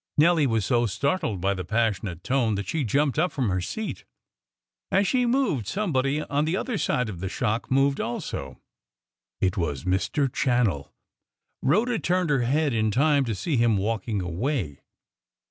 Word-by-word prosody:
Nelly 155 -1 +4
was 115 -4 0
so 120 +1 +2
startled 115 - -1
by 100 +2 +2
the 95 -1 -4
passionate 100 -4 -1
tone 125 -5 +1
that 100 0 -4
she 160 -3 -1
jumped 140 +5 +1
up 180 +3 +2
from 130 -7 -1
her 95 -1 0
seat. 220 - -5 0.9
As 195 +1 +3
she 250 -2 +2
moved, 235 - +1
somebody 150 - 0
on 145 +2 0
the 165 +4 0
other 225 -2 -2
side 125 -2 0
of 95 -5 -6
the 95 +1 -3
shock 110 +4 -2
moved 135 +1 +2
also. 70 - -5 0.8
It 95 -1 +1
was 75 -6 -2
Mr. 95 - +1
Channell. 120 - 0 0.7
Rhoda 225 - +2
turned 180 -2 0
her 135 -3 +2
head 140 +3 +1
in 110 -1 +1
time 140 +4 +3
to 115 -3 -2
see 145 - -1
him 115 -3 +3
walking 105 0 -1
away. 90 - -2
125 Hz, 165 wpm, -25 LUFS, 100-150 Hz, 0.9 s, Nelly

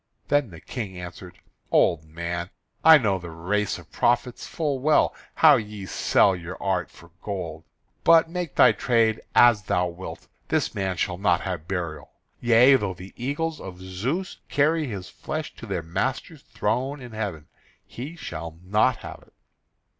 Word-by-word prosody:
Then 145 -4 +2
the 85 -3 -11
King 100 -2 -6
answered: 90 0 -9 0.3
"Old 80 -2 +3
man, 85 +2 -4 0.3
I 160 0 +10
know 100 -8 +1
the 85 -1 -8
race 95 +6 -1
of - - -15
prophets 120 0 0
full 145 -5 -2
well, 150 +4 +3 0.2
how - - +7
ye 105 -2 -6
sell 95 +1 +3
your 90 +1 -7
art 95 -3 -1
for 85 0 -17
gold. 85 -6 -5 0.4
But, 165 -1 +6
make 175 -2 -4
thy - - +7
trade 115 -3 +1
as 120 -3 +6
thou 90 -2 0
wilt, 85 +2 -9 0.2
this - - 0
man 95 -2 -2
shall 90 -1 -1
not 95 -4 +2
have 85 -4 -4
burial; 85 -6 -4 0.3
yea, 120 +3 +6
though 100 -6 -3
the 95 +2 -11
eagles 150 +6 -2
of 90 -1 -9
Zeus 115 - -3
carry 155 +1 +2
his 100 -6 -6
flesh 155 0 -5
to 115 - -9
their 95 -4 -2
master's 130 - -3
throne 120 +6 -2
in 125 -2 -10
heaven, 100 -9 -4 0.4
he 140 +8 -8
shall 85 - -7
not 105 +6 +2
have - - -8
it." - - -28
100 Hz, 160 wpm, -25 LUFS, 90-130 Hz, 0.4 s, I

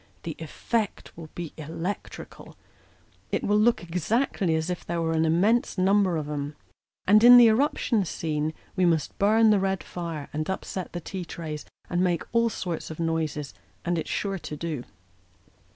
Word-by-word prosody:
The 165 - -4
eifect 205 +7 -3
will 160 -1 -10
be 170 -3 -6
electrical; 165 +5 -6 0.7
it - - 0
will 210 +1 +3
look 230 -3 +3
exactly 180 - 0
as 160 +3 -1
if 180 - -4
there 170 0 -3
were 165 -1 0
an 160 0 +2
immense 200 +9 +2
number 190 -1 +3
of 150 -2 -3
'em. 145 0 -4 0.5
And 210 +3 +6
in 245 +1 +11
the 240 -2 +9
eruption 230 -2 +2
scene 155 -2 -2 0.2
we 185 - +1
must 165 -4 +1
burn 220 +2 +5
the 205 - +4
red 190 -1 -1
fire, 165 -5 -5
and 155 +3 -2
upset 190 -1 -4
the 175 - -4
tea 185 +2 -5
trays, 155 -3 -6 0.2
and 175 0 0
make 175 -3 +1
all 230 0 +3
sorts 175 -6 -4
of 160 - -8
noises 160 -3 -2 0.3
and 175 +1 +1
it's - - -5
sure 195 -2 -2
to 150 - -7
do." 155 -6 -4
175 Hz, 170 wpm, -26 LUFS, 160-200 Hz, 0.7 s, in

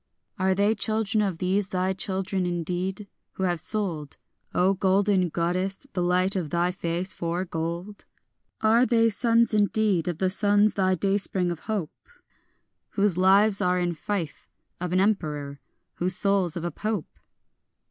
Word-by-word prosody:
Are 190 0 +2
they 205 +3 +3
children 220 -1 0
of 195 -5 -1
these 190 +3 0
thy 185 +1 0
children 190 -1 -2
indeed, 180 +4 -3 0.3
who 190 - -4
have 175 -2 0
sold, 170 -8 -3 0.3
O 185 +2 +2
golden 190 -1 +2
goddess, 185 - -2
the 185 - -1
light 180 +2 +1
of 175 -5 -2
thy 175 +2 +1
face 180 0 -2
for 170 +2 -3
gold? 170 +4 -5 0.6
Are 225 +2 +4
they 230 -2 +3
sons 230 +1 +3
indeed 205 -4 +1
of 175 -3 -2
the 185 +1 0
sons 205 +1 +4
of - - -23
thy 185 -1 +2
dayspring 195 -1 0
of 170 - -5
hope, 200 -8 -2 1.0
Whose 200 -3 +2
lives 195 +3 +4
are 180 0 +2
in 175 -1 0
fief 170 -1 -5 0.3
of 180 0 -4
an 185 - +2
emperor, 150 -8 -1 0.4
whose 180 +1 0
souls 195 -4 +1
of 170 - -5
a 175 - -2
Pope? 210 +1 -4
190 Hz, 155 wpm, -25 LUFS, 175-205 Hz, 1.0 s, Are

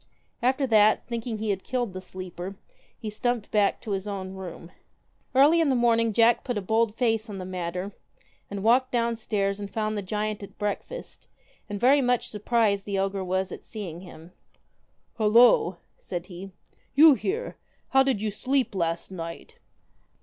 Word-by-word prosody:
After 260 +3 +2
that, 215 -3 +4
thinking 230 -1 -4
he 215 -1 -1
had 195 -1 -3
killed 245 -6 -2
the 185 - -6
sleeper, 185 0 -7 0.4
he 215 -2 -5
stumped 240 0 -2
back 205 -2 +2
to 215 - -6
his 195 +1 -2
own 190 -2 -5
room. 180 -2 -9 0.6
Early 300 +5 +6
in 315 - +2
the 265 - +3
morning 230 -2 +3
Jack 230 +2 +4
put 245 -4 -2
a - - -1
bold 220 +2 +1
face 225 -2 0
on 200 - -6
the 185 - -6
matter, 180 +1 -4 0.6
and 200 -1 -5
walked 255 +3 +4
downstairs 220 -4 0
and 200 -1 -5
found 215 +1 -2
the 205 - -2
giant 210 +2 -3
at 200 - -11
breakfast, 210 - -5 0.4
and 205 -1 -4
very 270 +5 +5
much 245 -2 +1
surprised 210 -2 +1
the 200 -1 -1
ogre 195 0 -1
was 185 0 -1
at - - -8
seeing 180 -7 -7
him. 170 -2 -13 0.9
1 215 -2 +2
Halloo 240 +1 +7
1 - - -24
' - - -43
said 175 -1 -5
he, 185 +1 -9 0.5
'you 305 +1 +9
here! 415 - -3 0.3
How 270 - +5
did 265 -6 +1
you 215 - 0
sleep 260 +3 0
last 170 -1 -2
night 165 -2 -8
210 Hz, 180 wpm, -26 LUFS, 190-240 Hz, 0.9 s, you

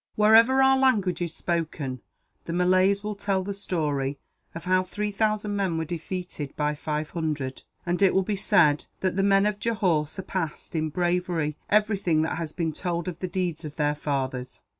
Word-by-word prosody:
"Wherever 230 +5 +6
our 265 0 +5
language 210 -10 +2
is 170 -2 -1
spoken, 155 -7 -2 0.4
the 165 - -4
Malays 185 +3 +3
will 210 0 -2
tell 200 -2 -1
the 200 +1 -4
story 145 -8 -2 0.4
of 165 +1 -7
how 185 0 +3
three 210 +3 -3
thousand 210 0 0
men 190 -5 0
were 160 - -1
defeated 170 -3 -5
by 150 0 0
five 150 +1 -3
hundred; 150 -6 -3 0.2
and 175 +1 -1
it 195 - +4
will 190 - +4
be 205 +2 -1
said 150 -6 +3 0.2
that 185 -2 0
the 195 - +2
men 195 0 +4
of 210 -1 0
Johore 185 -10 +1
surpassed, 175 -1 -5
in 155 -1 0
bravery, 175 -2 0
everything 200 -7 +2
that 160 - -2
has 165 -3 -4
been 160 -1 -2
told 175 +1 -3
of 175 -2 -5
the 185 - -2
deeds 175 -3 -2
of 150 -2 -7
their 150 -1 +1
fathers. 130 -4 -3
180 Hz, 180 wpm, -26 LUFS, 155-200 Hz, 0.4 s, Wherever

